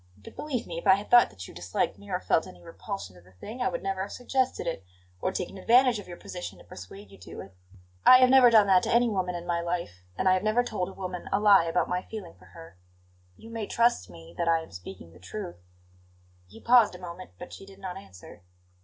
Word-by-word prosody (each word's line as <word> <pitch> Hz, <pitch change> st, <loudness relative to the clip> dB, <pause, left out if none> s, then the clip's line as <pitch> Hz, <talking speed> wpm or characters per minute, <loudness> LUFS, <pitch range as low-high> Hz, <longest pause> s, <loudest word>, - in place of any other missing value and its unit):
But 100 Hz, -, -14 dB
believe 265 Hz, -6 st, -3 dB
me, 170 Hz, -1 st, -5 dB
if 170 Hz, -, -6 dB
I 190 Hz, -, +8 dB
had 200 Hz, +2 st, -8 dB
thought 240 Hz, 0 st, +7 dB
that 95 Hz, -2 st, -10 dB
you -, -, -12 dB
disliked 90 Hz, +2 st, -2 dB
me, 205 Hz, -, -14 dB
or 180 Hz, -1 st, -1 dB
felt 165 Hz, -, +1 dB
any 90 Hz, -, -13 dB
repulsion 95 Hz, +2 st, -7 dB
to 90 Hz, -, -16 dB
the 90 Hz, +1 st, -22 dB
thing, 215 Hz, -, -9 dB
I 250 Hz, -, +2 dB
would 255 Hz, 0 st, -5 dB
never 195 Hz, -1 st, -2 dB
have 200 Hz, -, -5 dB
suggested 260 Hz, +1 st, -1 dB
it, 165 Hz, -, -4 dB, 0.4 s
or -, -, 0 dB
taken 190 Hz, +1 st, -5 dB
advantage 245 Hz, +2 st, +4 dB
of 205 Hz, -, -11 dB
your 175 Hz, -1 st, -9 dB
position 180 Hz, -1 st, -8 dB
to -, -, -15 dB
persuade 95 Hz, +2 st, -12 dB
you 100 Hz, -, -15 dB
to 95 Hz, -, -9 dB
it. 95 Hz, -, -13 dB, 0.5 s
I 255 Hz, -, +9 dB
have 255 Hz, 0 st, +5 dB
never 260 Hz, -2 st, +8 dB
done 220 Hz, -3 st, +6 dB
that 190 Hz, -2 st, +5 dB
to -, -, -2 dB
any 240 Hz, +1 st, +4 dB
woman 185 Hz, -5 st, -1 dB
in 175 Hz, 0 st, -6 dB
my 170 Hz, -1 st, -1 dB
life, 170 Hz, -, -4 dB, 0.2 s
and 190 Hz, -, 0 dB
I 185 Hz, -, +6 dB
have 185 Hz, -, +1 dB
never 215 Hz, +4 st, +2 dB
told 195 Hz, -6 st, -3 dB
a -, -, -11 dB
woman 180 Hz, -2 st, -6 dB
a 195 Hz, -, +2 dB
lie 200 Hz, -4 st, +6 dB
about 165 Hz, +1 st, 0 dB
my 180 Hz, 0 st, -1 dB
feeling 200 Hz, -4 st, -9 dB
for 90 Hz, 0 st, -20 dB
her. 85 Hz, 0 st, -14 dB, 0.6 s
You 225 Hz, -, -13 dB
may 225 Hz, -3 st, -4 dB
trust 230 Hz, -, +1 dB
me 85 Hz, -1 st, -13 dB
that 170 Hz, -, 0 dB
I 165 Hz, -1 st, +2 dB
am -, -, -15 dB
speaking 90 Hz, -2 st, -10 dB
the 90 Hz, -, -16 dB
truth 90 Hz, -1 st, -7 dB, 0.5 s
" 90 Hz, 0 st, -33 dB
He 110 Hz, +3 st, -14 dB
paused 235 Hz, -5 st, +5 dB
a -, -, -10 dB
moment, 180 Hz, 0 st, -9 dB
but 180 Hz, -, -10 dB
she 195 Hz, -, -11 dB
did 195 Hz, -1 st, -14 dB
not 190 Hz, -2 st, -6 dB
answer. 90 Hz, -, -13 dB
180 Hz, 255 wpm, -27 LUFS, -, 0.6 s, I